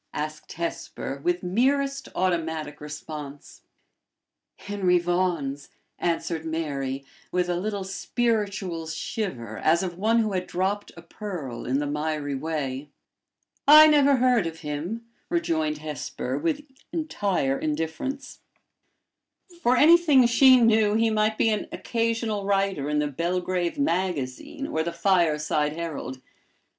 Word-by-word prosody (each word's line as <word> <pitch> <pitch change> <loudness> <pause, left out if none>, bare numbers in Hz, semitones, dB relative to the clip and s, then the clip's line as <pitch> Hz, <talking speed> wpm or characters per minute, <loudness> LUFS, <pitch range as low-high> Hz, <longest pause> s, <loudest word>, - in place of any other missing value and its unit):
asked 155 0 -5
Hesper, 160 -4 -5
with 175 +1 0
merest 275 +8 +1
automatic 160 -5 -1
response. 150 -1 -8 1.0
"Henry 195 -3 +1
Vaughan's," 175 -6 -1 0.3
answered 165 -1 -1
Mary, 140 -4 -3 0.3
with 180 0 +1
a 175 - 0
little 205 0 -3
spiritual 200 -5 -1
shiver 160 - -4
as 165 +3 +3
of 175 -1 -5
one 225 +3 +3
who 220 -2 +2
had 185 -1 -2
dropped 190 +3 -2
a 170 - -10
pearl 170 - -6
in 130 +2 +1
the 145 - -1
miry 150 0 -2
way. 140 -1 -3 0.8
"I 305 +1 +11
never 285 -2 +5
heard 245 -7 +3
of 165 0 -7
him," 165 +10 -4 0.2
rejoined 160 - 0
Hesper, 150 -4 -4
with 300 -2 -1 0.3
entire 200 - -1
indifference. 165 - -3 1.2
For 250 +1 +3
anything 310 -5 +6
she 255 +2 +7
knew, 220 -2 +4
he 225 0 +3
might 215 0 +1
be 225 - +3
an 210 - -1
occasional 230 -3 -1
writer 195 -7 0
in 150 - 0
"The 150 0 +1
Belgrave 175 +3 -1
Magazine," 185 - -2
or 160 - -1
"The 170 +1 -3
Fireside 155 -4 +2
Herald." 155 -5 -5
175 Hz, 125 wpm, -25 LUFS, 150-220 Hz, 1.2 s, I